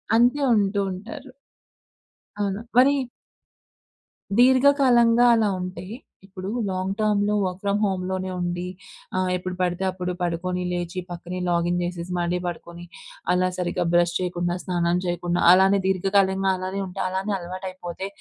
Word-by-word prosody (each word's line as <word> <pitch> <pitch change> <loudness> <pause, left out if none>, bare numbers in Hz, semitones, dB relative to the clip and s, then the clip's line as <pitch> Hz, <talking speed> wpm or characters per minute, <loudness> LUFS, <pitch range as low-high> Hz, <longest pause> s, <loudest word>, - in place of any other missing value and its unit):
అంతే 245 +5 +4
ఉంటూ 200 -1 +1
ఉంటారు. 235 +9 -8 1.1
అవును. 200 -1 -1 0.2
మరి 270 +3 +6 1.5
దీర్ఘకాలంగా 250 -2 +5
అలా 220 -2 +3
ఉంటే, 180 0 -6 0.4
ఇప్పుడు 190 0 -7 0.2
లాంగ్ 185 +1 -2
టర్మ్‌లో 210 -1 +2
వర్క్ 185 0 -3
ఫ్రమ్ 200 0 +1
హోమ్‌లోనే 185 -1 -2
ఉండి 175 0 -2 0.5
ఆహ్, 185 0 +1
ఎప్పుడు 180 0 -4
పడితే 180 +1 0
అప్పుడు 180 -1 -4
పడుకొని 180 +1 -2
లేచి 175 +1 -3
పక్కనే 175 +1 -6
లాగిన్ 175 0 +1
జేసేసి 175 0 -5
మళ్ళీ 175 +1 0
పడుకొని. 170 0 -7 0.5
అలా 185 0 +2
సరిగ్గా 175 -1 -1
బ్రష్ 175 0 +3
చేయకుండా, 175 -1 -2
స్నానం 175 -1 0
చేయకుండా 175 0 -1
అలానే 190 +2 +4
దీర్ఘకాలంగా 190 0 +2
అలానే 185 +2 -4
ఉంటే 185 +1 -6
అలానే 190 +3 -2
అలవాటు 185 +2 -6
అయిపోతే. 185 +1 -6
185 Hz, 130 wpm, -24 LUFS, 175-200 Hz, 1.5 s, మరి